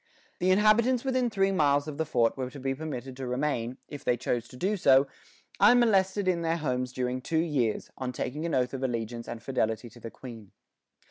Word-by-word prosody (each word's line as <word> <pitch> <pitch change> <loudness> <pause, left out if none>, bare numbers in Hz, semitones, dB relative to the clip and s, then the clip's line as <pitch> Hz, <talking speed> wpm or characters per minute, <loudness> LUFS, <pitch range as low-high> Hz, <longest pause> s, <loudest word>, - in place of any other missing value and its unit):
The 180 - +1
inhabitants 215 +5 +4
within 255 -2 +1
three 195 -2 +1
miles 145 -4 +2
of 150 0 -6
the 160 - 0
fort 115 -5 +2
were 130 -2 -4
to 140 - -10
be 135 0 -1
permitted 135 -3 -6
to 130 -1 -5
remain, 125 -2 -1
if 145 -2 -9
they 125 - +1
chose 120 -1 -2
to 125 - -13
do 195 +9 0
so, 135 -7 +5 0.5
unmolested, 205 -4 +4
in 175 -2 +2
their 165 0 0
homes 125 -5 -2
during 125 0 -2
two 160 +5 -2
years, 145 -9 0
on 130 -1 -2
taking 140 +4 -4
an 165 - -1
oath 125 0 0
of 135 - -4
allegiance 115 -2 -3
and 115 -1 -7
fidelity 115 -3 -1
to 120 - -15
the 115 - -7
Queen. 115 -5 -11
135 Hz, 205 wpm, -28 LUFS, 125-180 Hz, 0.5 s, so